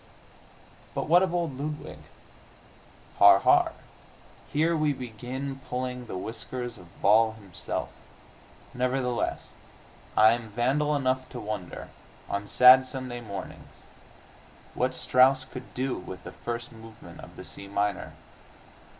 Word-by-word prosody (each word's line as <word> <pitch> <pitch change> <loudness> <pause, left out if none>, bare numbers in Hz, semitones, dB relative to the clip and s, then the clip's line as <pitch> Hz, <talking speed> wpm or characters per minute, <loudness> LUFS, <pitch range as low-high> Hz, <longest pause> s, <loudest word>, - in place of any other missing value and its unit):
But - - -2
what 175 +3 +6
of 190 -2 +1
old 170 -7 -2
Ludwig? 150 +1 -5 1.2
Har, - - +9
har; - - +4 0.8
here 160 +3 +2
we 155 -2 +1
begin 130 +3 -6
pulling 125 -1 -4
the 95 - -5
whiskers 120 +4 -5
of 85 -1 -17
Baal 110 +2 +5
Himself. 100 -5 -5 0.8
Nevertheless, 125 -1 -1 0.7
I 110 +1 +8
am 115 -1 -3
vandal 135 +7 +1
enough 130 -2 0
to 125 - -7
wonder, 105 -5 -6 0.4
on 100 0 -3
sad 130 +3 +8
Sunday 130 -2 -5
mornings, 100 -4 -9 0.9
what 130 +1 0
Strauss 130 +1 +4
could 130 -1 -10
do 130 +1 -1
with 90 0 -9
the - - -8
first 120 0 -5
movement 110 -1 -13
of - - -12
the - - -10
C 100 - -6
minor. 100 0 -2
125 Hz, 125 wpm, -27 LUFS, 110-130 Hz, 1.2 s, Har